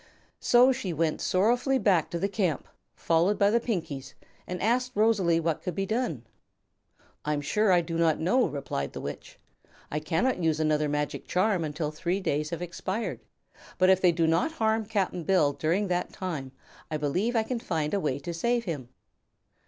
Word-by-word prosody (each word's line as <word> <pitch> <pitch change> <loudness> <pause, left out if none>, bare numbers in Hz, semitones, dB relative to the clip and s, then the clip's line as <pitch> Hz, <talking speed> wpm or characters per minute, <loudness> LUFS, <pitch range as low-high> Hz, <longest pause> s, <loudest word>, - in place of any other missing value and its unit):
So 250 +2 +5
she 225 -9 -3
went 160 0 0
sorrowfully 240 +8 +2
back 195 - +2
to 170 - -3
the 195 - 0
camp, 190 - -1 0.3
followed 170 +5 +2
by 200 0 +4
the 235 - +3
Pinkies, 160 - -4 0.3
and 180 0 -4
asked 250 +5 +1
Rosalie 200 -6 +3
what 165 -1 -1
could 180 - -4
be 195 - -1
done. 215 - -2 1.0
"I'm 150 -1 0
sure 205 +8 +1
I 175 -1 +5
do 165 0 -4
not 165 -2 +3
know," 240 +10 +3
replied 135 - -4
the - - -6
Witch. - - -7 0.5
"I 150 - -1
cannot 165 - 0
use 160 -2 +1
another 155 -1 +1
magic 150 0 -2
charm 185 -1 +1
until 150 0 -3
three 175 +5 -2
days 150 -5 -1
have 170 +1 -4
expired, 190 +5 -4 0.6
but 185 0 +5
if 190 0 +3
they 180 - +5
do 165 0 +1
not 165 - +1
harm 220 -5 +1
Cap'n 190 -5 -1
Bill 155 -5 +3
during 175 +8 0
that 180 0 -1
time 155 -8 -5 0.4
I 155 - -1
believe 180 - 0
I 225 - +3
can 240 +2 -3
then 240 - -18
find 155 -3 -1
a 200 - +2
way 150 -7 -1
to 155 +5 -6
save 235 +7 0
him." 145 - -4
175 Hz, 185 wpm, -28 LUFS, 155-210 Hz, 1.0 s, So